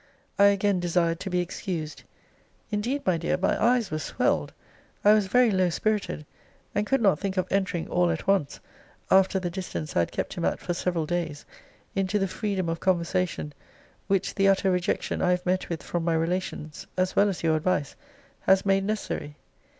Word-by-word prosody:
I 200 Hz, -, +8 dB
again 200 Hz, -1 st, +3 dB
desired 170 Hz, -1 st, +1 dB
to -, -, -5 dB
be 180 Hz, -1 st, +1 dB
excused. 170 Hz, -3 st, -5 dB, 0.7 s
Indeed, 235 Hz, +7 st, -1 dB
my 180 Hz, -3 st, +2 dB
dear, 175 Hz, +2 st, 0 dB
my 185 Hz, -, 0 dB
eyes 235 Hz, -4 st, +3 dB
were 155 Hz, -, -1 dB
swelled: -, -, 0 dB, 0.5 s
I 210 Hz, -, +8 dB
was 210 Hz, -2 st, +3 dB
very 245 Hz, +2 st, +4 dB
low 185 Hz, -2 st, +2 dB
spirited; 205 Hz, -4 st, -1 dB, 0.5 s
and 205 Hz, +1 st, 0 dB
could 270 Hz, -3 st, +1 dB
not 190 Hz, -7 st, +4 dB
think 195 Hz, -1 st, -3 dB
of 185 Hz, -, +2 dB
entering 190 Hz, -4 st, 0 dB
all 175 Hz, 0 st, +2 dB
at 165 Hz, -1 st, -2 dB
once, 195 Hz, -7 st, +1 dB, 0.5 s
after 190 Hz, 0 st, +5 dB
the 175 Hz, -2 st, -3 dB
distance 175 Hz, -4 st, -5 dB
I -, -, +3 dB
had 85 Hz, -, 0 dB
kept -, -, -3 dB
him -, -, -4 dB
at -, -, 0 dB
for 175 Hz, -, -3 dB
several 170 Hz, -2 st, -1 dB
days, 165 Hz, -3 st, -3 dB, 0.5 s
into 195 Hz, +1 st, 0 dB
the 195 Hz, -1 st, +1 dB
freedom 190 Hz, -2 st, -2 dB
of 165 Hz, 0 st, -2 dB
conversation 180 Hz, -4 st, 0 dB, 0.5 s
which 195 Hz, -1 st, +1 dB
the 195 Hz, -1 st, +2 dB
utter 195 Hz, 0 st, +3 dB
rejection 180 Hz, -1 st, -1 dB
I 180 Hz, -, +2 dB
have 180 Hz, 0 st, +1 dB
met 185 Hz, +1 st, 0 dB
with 170 Hz, -2 st, -4 dB
from 175 Hz, -1 st, -2 dB
my 165 Hz, -1 st, +1 dB
relations, 165 Hz, -2 st, -3 dB
as 185 Hz, 0 st, 0 dB
well 205 Hz, +1 st, +4 dB
as 185 Hz, -, -4 dB
your 160 Hz, -1 st, +3 dB
advice, 155 Hz, -3 st, 0 dB, 0.5 s
has 190 Hz, +1 st, +5 dB
made 195 Hz, 0 st, +3 dB
necessary. 195 Hz, -8 st, -3 dB
185 Hz, 190 wpm, -26 LUFS, 170-195 Hz, 0.7 s, I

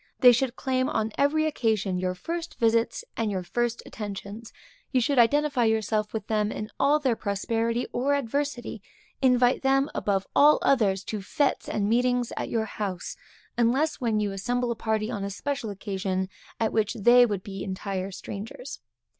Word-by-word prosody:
They 250 Hz, -2 st, +10 dB
should 245 Hz, +1 st, 0 dB
claim 260 Hz, 0 st, 0 dB
on 220 Hz, 0 st, -1 dB
every 305 Hz, +3 st, +2 dB
occasion 215 Hz, -10 st, 0 dB
your 185 Hz, 0 st, -1 dB
first 335 Hz, -, -5 dB
visits 230 Hz, 0 st, +1 dB
and 225 Hz, -2 st, -1 dB
your 190 Hz, -3 st, -2 dB
first 240 Hz, +6 st, -2 dB
attentions; 205 Hz, +1 st, -7 dB, 0.4 s
you 260 Hz, -, +3 dB
should 255 Hz, +2 st, +2 dB
identify 285 Hz, +1 st, +3 dB
yourself 220 Hz, -1 st, 0 dB
with 215 Hz, -2 st, -4 dB
them 215 Hz, -1 st, 0 dB
in 215 Hz, +1 st, -5 dB
all 285 Hz, +2 st, +4 dB
their 265 Hz, -6 st, +1 dB
prosperity 225 Hz, +4 st, -1 dB
or 275 Hz, +4 st, +1 dB
adversity; 280 Hz, -3 st, -3 dB, 0.4 s
invite 250 Hz, -1 st, +4 dB
them 270 Hz, +1 st, +2 dB
above 195 Hz, -2 st, 0 dB
all 295 Hz, +1 st, +7 dB
others 205 Hz, -8 st, +2 dB
to 215 Hz, -, -4 dB
fêtes 275 Hz, +8 st, 0 dB
and 205 Hz, -1 st, -1 dB
meetings 245 Hz, +1 st, +1 dB
at -, -, -3 dB
your 225 Hz, -1 st, 0 dB
house, 195 Hz, -5 st, -4 dB, 0.4 s
unless 265 Hz, +7 st, +2 dB
when 225 Hz, -3 st, +1 dB
you 205 Hz, -1 st, 0 dB
assemble 245 Hz, +5 st, -1 dB
a -, -, -2 dB
party 220 Hz, 0 st, -1 dB
on 205 Hz, -4 st, -3 dB
a 200 Hz, -, -2 dB
special 260 Hz, +3 st, -3 dB
occasion, 190 Hz, -2 st, -3 dB, 0.3 s
at 225 Hz, -1 st, 0 dB
which 215 Hz, -2 st, +1 dB
they 240 Hz, +3 st, +6 dB
would 205 Hz, -5 st, -1 dB
be 195 Hz, -1 st, -6 dB
entire 190 Hz, 0 st, -3 dB
strangers. 210 Hz, +7 st, -7 dB
225 Hz, 170 wpm, -26 LUFS, 205-255 Hz, 0.4 s, They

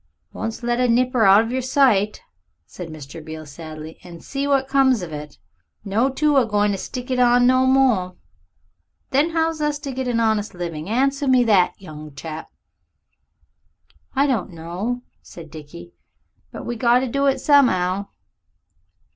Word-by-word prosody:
"Once 225 Hz, +2 st, -5 dB
let 240 Hz, 0 st, 0 dB
a 250 Hz, -, +3 dB
nipper 245 Hz, -1 st, +2 dB
out 195 Hz, +2 st, +7 dB
of 230 Hz, -, -5 dB
yer 260 Hz, +1 st, -1 dB
sight," 245 Hz, -6 st, +2 dB, 0.4 s
said 180 Hz, -, -9 dB
Mr. 155 Hz, +1 st, -10 dB
Beale 155 Hz, 0 st, -8 dB
sadly, 155 Hz, +1 st, -10 dB
"and 170 Hz, -2 st, -12 dB
see 280 Hz, 0 st, -3 dB
what 270 Hz, -1 st, +2 dB
comes 265 Hz, -6 st, +3 dB
of 165 Hz, -3 st, -7 dB
it! 150 Hz, 0 st, -8 dB, 0.5 s
'No. 220 Hz, +7 st, +1 dB
2' 295 Hz, +2 st, +1 dB
a 260 Hz, -, +4 dB
goin' 205 Hz, -1 st, +1 dB
to 195 Hz, -, -2 dB
stick 250 Hz, +5 st, -6 dB
it 255 Hz, -, 0 dB
on 245 Hz, 0 st, +5 dB
no 255 Hz, +1 st, +4 dB
more! 245 Hz, -9 st, +2 dB, 1.0 s
Then 285 Hz, +5 st, +3 dB
how's 325 Hz, -1 st, -1 dB
us 295 Hz, 0 st, 0 dB
to 290 Hz, -2 st, -6 dB
get 260 Hz, 0 st, -4 dB
a 240 Hz, -2 st, 0 dB
honest 220 Hz, -3 st, 0 dB
living? 170 Hz, -1 st, -5 dB
Answer 275 Hz, +4 st, +1 dB
me 255 Hz, -1 st, +5 dB
that, 200 Hz, -6 st, +3 dB
young 155 Hz, -5 st, -11 dB
chap." 155 Hz, +2 st, -7 dB, 1.7 s
"I 275 Hz, +1 st, +3 dB
don't 250 Hz, -9 st, 0 dB
know," 180 Hz, +9 st, -5 dB, 0.2 s
said 160 Hz, -3 st, -12 dB
Dickie, 145 Hz, -, -11 dB, 0.6 s
"but -, -, -8 dB
we 240 Hz, -, -3 dB
got 240 Hz, +1 st, +3 dB
to 260 Hz, -, -1 dB
do 275 Hz, +3 st, 0 dB
it 270 Hz, -, +2 dB
som'ow." 200 Hz, -9 st, +3 dB
230 Hz, 165 wpm, -21 LUFS, 175-260 Hz, 1.7 s, out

